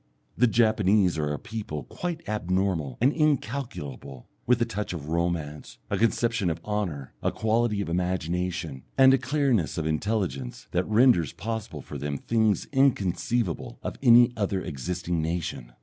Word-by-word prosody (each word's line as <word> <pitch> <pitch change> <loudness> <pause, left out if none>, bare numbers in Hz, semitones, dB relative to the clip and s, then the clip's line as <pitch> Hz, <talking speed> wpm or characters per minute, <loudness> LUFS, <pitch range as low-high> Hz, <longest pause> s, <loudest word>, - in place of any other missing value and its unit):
The 125 - +4
Japanese 105 -4 +3
are 75 -1 0
a 75 - -2
people 105 -10 -6
quite 170 - -5
abnormal 90 - -1
and 130 +5 +3
incalculable, 115 - -2 0.2
with 125 0 +4
a 120 - +2
touch 105 -4 -4
of 75 -3 -6
romance, 80 -3 -2
a 100 - +1
conception 115 -3 +1
of 80 0 -3
honour, 90 -11 -3
a - - +1
quality 110 -1 +1
of - - -3
imagination, 90 -3 -2 0.2
and 135 0 +7
a 135 - +4
clearness 130 - +1
of 80 - -1
intelligence 80 - -2
that 90 +1 0
renders 110 - +4
possible 110 -8 -5
for - - -7
them 70 -1 -3
things 110 +1 +1
inconceivable 120 - 0
of - - -4
any 120 -1 +7
other 100 -3 -1
existing 85 +2 -3
nation. 80 -7 -3
95 Hz, 150 wpm, -26 LUFS, 80-115 Hz, 0.2 s, and